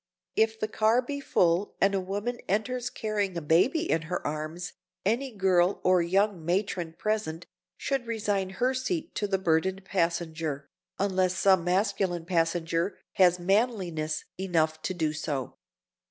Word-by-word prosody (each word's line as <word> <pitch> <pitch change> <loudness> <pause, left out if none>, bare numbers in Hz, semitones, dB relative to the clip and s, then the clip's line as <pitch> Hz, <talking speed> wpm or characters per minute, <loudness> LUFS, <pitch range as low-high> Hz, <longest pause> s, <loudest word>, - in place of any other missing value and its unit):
If 220 0 +2
the 215 - -1
car 220 +3 +2
be 280 +3 -4
full 180 -7 +1
and 195 - +3
a 195 - +2
woman 205 +6 -3
enters 240 +5 0
carrying 205 -6 -2
a - - +1
baby 245 - +3
in 160 - +1
her 180 - -3
arms, 155 +4 -4 0.3
any 240 +7 +1
girl 190 -3 +2
or 185 -1 +4
young 190 +1 +1
matron 175 -1 -1
present 175 -4 -2 0.3
should 270 -4 -2
resign 205 -4 -1
her 255 +2 +2
seat 320 +6 -2
to 205 - -1
the 195 -1 +1
burdened 190 +2 0
passenger, 165 -5 -1 0.3
unless 185 -2 +1
some 190 -3 +4
masculine 185 -2 0
passenger 165 +1 0 0.2
has 180 -2 +6
manliness 180 -5 0
enough 160 -4 +1
to 185 - -3
do 160 -3 0
so. 145 -4 -4
185 Hz, 145 wpm, -28 LUFS, 170-215 Hz, 0.3 s, has